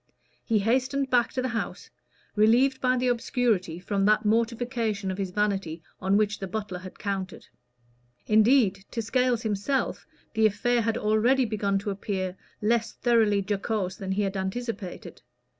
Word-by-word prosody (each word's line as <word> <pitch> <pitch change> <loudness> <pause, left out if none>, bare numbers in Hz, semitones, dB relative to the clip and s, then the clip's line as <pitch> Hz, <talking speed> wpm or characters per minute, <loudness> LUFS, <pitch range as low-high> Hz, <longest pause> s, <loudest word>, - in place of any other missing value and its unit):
He 225 - +1
hastened 260 +5 0
back 245 -2 +3
to 255 - -1
the 260 - -1
house, 225 - -4 0.4
relieved 245 +5 +4
by 255 0 +2
the 250 +1 0
obscurity 230 -8 0
from 195 +2 -1
that 215 +1 +3
mortification 230 -2 0
of 185 - -6
his 195 -1 -2
vanity 190 -5 -1 0.2
on 195 +2 +2
which 215 0 +1
the 195 - -4
butler 195 -2 -4
had 185 0 -11
counted. 195 -3 -4 0.8
Indeed, 215 -3 +4
to 230 - -3
Scales 250 0 +1
himself 220 +5 -1 0.3
the 220 -1 +4
affair 235 +4 +1
had 225 0 0
already 235 +5 +3
begun 200 -3 0
to 200 +1 -3
appear 190 -2 -3 0.3
less 230 +1 +1
thoroughly 220 -5 +2
jocose 200 -2 -2
than 190 -1 -3
he 205 +2 0
had 195 0 -2
anticipated. 190 0 -5
215 Hz, 155 wpm, -27 LUFS, 195-240 Hz, 0.8 s, relieved